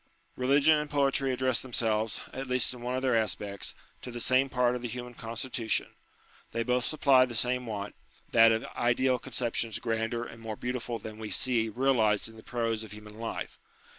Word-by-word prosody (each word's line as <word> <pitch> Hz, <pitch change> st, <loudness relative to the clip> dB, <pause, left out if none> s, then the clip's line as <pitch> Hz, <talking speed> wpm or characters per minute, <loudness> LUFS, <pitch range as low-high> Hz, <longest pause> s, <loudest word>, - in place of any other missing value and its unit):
Eeligion 145 Hz, +4 st, +4 dB
and 150 Hz, -, -6 dB
poetry 140 Hz, -2 st, +2 dB
address 130 Hz, -1 st, +1 dB
themselves, 115 Hz, -3 st, 0 dB
at 135 Hz, 0 st, -5 dB
least 125 Hz, 0 st, +2 dB
in 125 Hz, -, -10 dB
one 125 Hz, +1 st, -2 dB
of 130 Hz, -, -2 dB
their 130 Hz, -3 st, +3 dB
aspects, 100 Hz, -2 st, -1 dB, 0.3 s
to -, -, -7 dB
the 120 Hz, 0 st, -6 dB
same 130 Hz, +3 st, +3 dB
part 125 Hz, -1 st, +2 dB
of 125 Hz, -, -4 dB
the 120 Hz, -, -3 dB
human 125 Hz, +1 st, -6 dB
constitution: 115 Hz, 0 st, -2 dB, 0.6 s
they 115 Hz, -, 0 dB
both 125 Hz, +1 st, +1 dB
supply 140 Hz, -4 st, +5 dB
the 125 Hz, -2 st, -3 dB
same 125 Hz, +1 st, 0 dB
want, 105 Hz, -2 st, -4 dB, 0.4 s
that 115 Hz, -1 st, +7 dB
of 110 Hz, 0 st, 0 dB
ideal 125 Hz, +1 st, +2 dB
conceptions 115 Hz, -3 st, -2 dB
grander 115 Hz, 0 st, -1 dB
and 115 Hz, -1 st, -10 dB
more 110 Hz, -1 st, -4 dB
beautiful 120 Hz, 0 st, -3 dB
than 110 Hz, -1 st, -9 dB
we 110 Hz, -1 st, -5 dB
see 115 Hz, -2 st, +1 dB
realized 110 Hz, -4 st, +2 dB
in 115 Hz, -, -12 dB
the 110 Hz, -, -12 dB
prose 115 Hz, -2 st, -2 dB
of 110 Hz, -, -10 dB
human 105 Hz, 0 st, -11 dB
life. 115 Hz, 0 st, -5 dB
120 Hz, 190 wpm, -30 LUFS, 115-130 Hz, 0.6 s, that